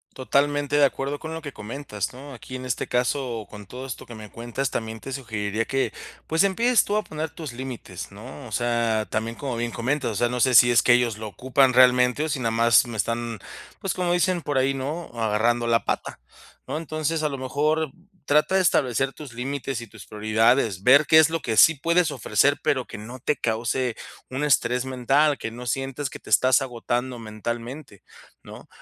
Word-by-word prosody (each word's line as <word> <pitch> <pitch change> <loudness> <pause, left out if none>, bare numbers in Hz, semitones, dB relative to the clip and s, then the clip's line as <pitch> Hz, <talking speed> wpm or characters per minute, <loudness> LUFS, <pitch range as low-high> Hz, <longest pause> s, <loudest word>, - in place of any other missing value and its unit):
Totalmente 145 +2 +1
de 145 - +5
acuerdo 140 +1 -1
con 160 0 -6
lo 160 - -5
que 145 -3 -7
comentas, 105 -3 -5
¿no? 135 +2 -10
Aquí, 130 +1 -8
en 130 - -7
este 125 - -2
caso, 125 -3 -1
con 105 -1 -11
todo 130 +6 -8
esto 130 - -7
que 120 - -10
me 110 -1 -10
cuentas, 120 +5 -4
también 110 0 -4
te 135 - -8
sugeriría 110 -4 -3
que, 135 0 -1 0.3
pues, 160 +1 +2
empieces 230 +5 +3
tú 205 - -1
a 215 - 0
poner 155 0 -5
tus 155 -4 -8
límites, 120 -8 -7
¿no? 125 +5 -10
O - - -13
sea, 115 -1 0
también, 115 +1 -3
como 135 -4 -4
bien 120 0 -2
comentas, 125 +3 -1
o - - -4
sea, 120 - +2
no 125 0 -3
sé 130 +1 +3
si 120 +1 +8
es 120 - +5
que 120 - +5
ellos 120 -3 +1
lo 110 0 -6
ocupan 130 +4 +2
realmente, 125 +3 +5
o - - -2
si 145 -3 -2
nada 115 -2 0
más 115 +2 +4
me 115 - -6
están, 115 +2 -2 0.4
pues, 195 - -2
como 180 -1 0
dicen 175 0 +1
por 145 -3 -1
ahí, 135 +1 +2
¿no?: 150 +6 -4
"Agarrando 115 +1 +1
la 115 0 +2
pata, - - -3 0.5
¿no?". - - -3
Entonces, 155 0 -2
a 150 - +1
lo 140 -2 -5
mejor 150 +3 0 0.3
trata 150 +5 +3
de 190 - +4
establecer 135 -5 +2
tus 145 -5 -10
límites 135 0 -4
y 115 - -9
tus - - -13
prioridades, 110 -1 +1
ver 140 +4 +7
qué 160 - +7
es 160 0 +6
lo 165 0 -1
que 115 -5 -2
sí 165 +9 +7
puedes 170 +3 +1
ofrecer, - - +2
pero - - 0
que - - -8
no 115 +5 -9
te 140 +4 0
cause 115 +2 -1 0.3
un 130 +3 -3
estrés 125 -3 +2
mental, 135 +3 +2
que 115 - -5
no 120 +2 -9
sientes 135 +2 -2
que - - -10
te - - -13
estás 130 +1 +4
agotando 125 0 -3
mentalmente, 115 +2 -7 0.4
¿no? - - -12
130 Hz, 210 wpm, -24 LUFS, 115-145 Hz, 0.5 s, si